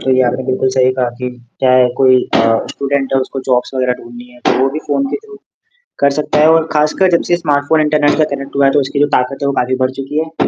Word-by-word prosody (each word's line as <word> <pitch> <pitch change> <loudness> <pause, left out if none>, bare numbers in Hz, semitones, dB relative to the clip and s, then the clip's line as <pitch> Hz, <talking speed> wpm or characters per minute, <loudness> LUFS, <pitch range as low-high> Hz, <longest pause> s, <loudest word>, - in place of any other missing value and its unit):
तो 130 - -2
ये 130 - +3
आपने 125 +1 -1
बिल्कुल 130 0 0
सही 130 0 +2
कहा 130 -1 -1
कि 125 -1 -4 0.3
चाहे 130 -1 +4
कोई 130 -1 +4 0.2
अ, - - +4 0.3
स्टूडेंट 140 -1 -2
है 135 - +3
उसको 130 +1 -5
जॉब्स 125 +1 0
वगैरह 125 -1 0
ढूँढनी 120 +1 -11
है, 125 - -17
तो - - +1
वो 135 - +3
भी 155 - -4
फ़ोन 275 0 0
के - - -1
थ्रू 425 -1 -13 0.6
कर 140 - +4
सकता 150 0 0
है 155 - +5
और 165 0 +2
खासकर 155 +5 +2
जब 170 - +3
से 175 - +3
स्मार्टफ़ोन 150 0 +1
इंटरनेट 150 -1 +2
से 155 - +3
कनेक्ट 140 0 -9
हुआ 140 - +3
है 135 - +4
तो 145 - +2
उसकी 140 +1 -2
जो 145 - +3
ताकत 125 +2 -1
है 140 - 0
वो 140 - 0
काफ़ी 130 0 0
बढ़ 130 0 -1
चुकी 135 +3 -4
है। 160 0 -2
135 Hz, 265 wpm, -14 LUFS, 130-150 Hz, 0.6 s, है